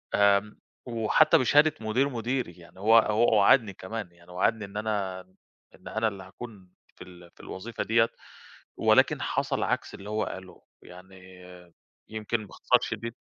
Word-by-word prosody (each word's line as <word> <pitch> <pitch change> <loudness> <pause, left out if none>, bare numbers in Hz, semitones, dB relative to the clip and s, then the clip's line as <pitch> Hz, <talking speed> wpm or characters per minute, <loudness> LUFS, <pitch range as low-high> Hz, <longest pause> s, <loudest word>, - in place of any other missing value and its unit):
آمم، 100 +1 +3 0.3
وحتى 115 -3 +3
بشهادة 145 +4 +4
مدير 115 +6 +1
مديري، 120 -4 -3
يعني 85 +2 -16
هو 110 +3 +5
هو 110 +1 +2
وعَدني 105 0 +4
كمان، 95 0 -7
يعني 85 +1 -19
وعدني 105 +4 0
إن 100 +1 -9
أنا 100 -4 -2 0.5
إن - - -16
أنا 110 +1 0
اللي 100 -3 -5
هاكون 95 0 -11 0.3
في - - -11
ال 90 -1 -15
في - - -27
الوظيفة 115 +5 -6
ديّة 115 0 +3 0.7
ولكن - - +3
حصَل - - -1
عكْس - - -2
اللي 100 +2 -9
هو 110 0 0
قاله 95 -1 -9 0.2
يعني 90 +2 -14 0.9
يمكن 110 0 -3
باختصار - - +2
شديد 115 +1 -4
105 Hz, 150 wpm, -27 LUFS, 95-115 Hz, 0.9 s, هو